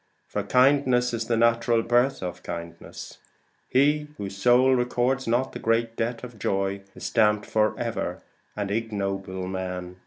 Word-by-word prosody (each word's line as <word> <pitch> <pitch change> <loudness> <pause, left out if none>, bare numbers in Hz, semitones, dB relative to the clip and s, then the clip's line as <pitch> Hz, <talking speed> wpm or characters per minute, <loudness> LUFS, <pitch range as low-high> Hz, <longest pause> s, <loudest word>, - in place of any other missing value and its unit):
For - - -2
kindness 125 -2 +3
is 115 -1 -2
the 115 0 0
natural 115 0 +3
birth 120 0 +2
of 90 - -5
kindness. 85 0 -8 0.5
Whose 145 -7 +1
soul 125 +5 +4
records 125 +1 0
not 120 +3 +1
the - - -7
great 115 0 0
debt 115 +1 -2
of 120 -3 -9
joy, 100 0 -1
Is - - -11
stamped 105 -2 +2
for 110 0 +1
ever - - -3 0.3
an 100 -1 -3
ignoble 100 -4 -3
man. 90 -1 -5
115 Hz, 145 wpm, -25 LUFS, 100-125 Hz, 0.5 s, soul